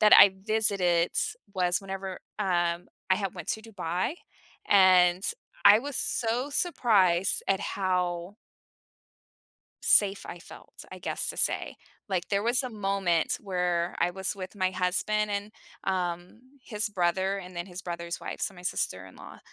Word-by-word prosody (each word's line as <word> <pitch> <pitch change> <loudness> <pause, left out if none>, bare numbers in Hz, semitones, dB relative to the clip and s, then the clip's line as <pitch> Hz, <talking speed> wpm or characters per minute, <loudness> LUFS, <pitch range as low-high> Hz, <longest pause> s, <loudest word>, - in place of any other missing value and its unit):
that 215 - +6
I 195 -1 +9
visited 195 -6 +2 0.4
was 180 +1 +1
whenever 195 -1 -6 0.2
um, 175 -3 0 0.2
I 190 - +5
had 195 -2 -3
went 175 -3 -8
to 220 - -2
Dubai, 185 - -3 0.6
and 185 -2 +6 0.4
I 210 - +9
was 280 +2 -5
so 245 +4 -1
surprised 205 - +2
at 195 0 +2
how 180 -1 -1 1.5
safe 200 -1 +4
I 175 - -8
felt, - - -13
I - - -8
guess, - - -2
to - - -9
say, - - 0 0.3
like, 185 -2 -2
there 200 +1 0
was 245 +3 +2
a 255 - -5
moment 195 -5 0
where 180 -3 -1
I 175 - +1
was 190 +2 -2
with 185 +1 -7
my 185 -2 0
husband 200 +4 0
and, 205 +1 -3 0.3
um, 180 +1 -2 0.3
his 210 0 -1
brother 190 +1 0
and 180 -1 -10
then 175 +2 -4
his 185 0 -8
brother's 170 -1 -5
wife, - - -6
so 195 - -2
my 180 - -13
sister-in-law, 95 - -4
190 Hz, 145 wpm, -28 LUFS, 175-205 Hz, 1.5 s, I